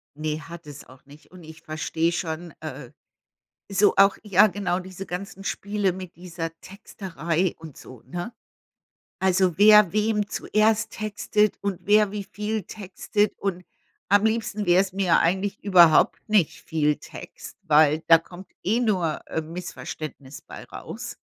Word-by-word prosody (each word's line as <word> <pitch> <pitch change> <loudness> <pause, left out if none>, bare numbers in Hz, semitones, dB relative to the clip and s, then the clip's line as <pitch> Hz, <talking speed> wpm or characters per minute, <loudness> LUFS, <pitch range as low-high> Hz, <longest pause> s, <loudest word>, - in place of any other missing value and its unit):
Ne, 155 0 -3
hat 170 0 -11
es 145 0 -10
auch 130 +1 -18
nicht. 145 +5 -18
Und 180 -2 -14
ich 155 0 -13
verstehe 160 +1 -1
schon 170 0 -4
äh, - - -8 0.8
so 200 +1 +3
auch 195 0 +5
ja 210 +1 +5
genau 190 -3 -2
diese 190 +1 -8
ganzen 195 +2 -7
Spiele 200 0 -1
mit 185 -2 -9
dieser 170 -2 -6
Texterei 185 -3 -3
und 160 -4 -11
so, 130 -3 -13
ne? 175 - -6 0.9
Also, 185 -2 +2
wer 210 -3 +7
wem 210 -1 0
zuerst 220 0 +1
textet 210 -1 0
und 200 -3 -3
wer 210 0 +4
wie 205 -1 -4
viel 210 +1 -4
textet. 205 +1 -2
Und 180 -2 -3 0.4
am 205 +1 +4
liebsten 220 -2 -1
wär's 185 +2 +3
mir 190 -2 +2
eigentlich 195 +4 0
überhaupt 175 -3 +5
nicht 210 -7 +2
viel 150 -2 0
Text, - - -11
weil 155 0 +4
da 165 -1 +8
kommt 175 +3 -13 0.2
eh 220 +5 +1
nur, 185 -9 0
äh, 160 - -2
Missverständnis 155 -4 -8
bei - - -11
raus. - - -8
185 Hz, 145 wpm, -24 LUFS, 165-205 Hz, 0.9 s, da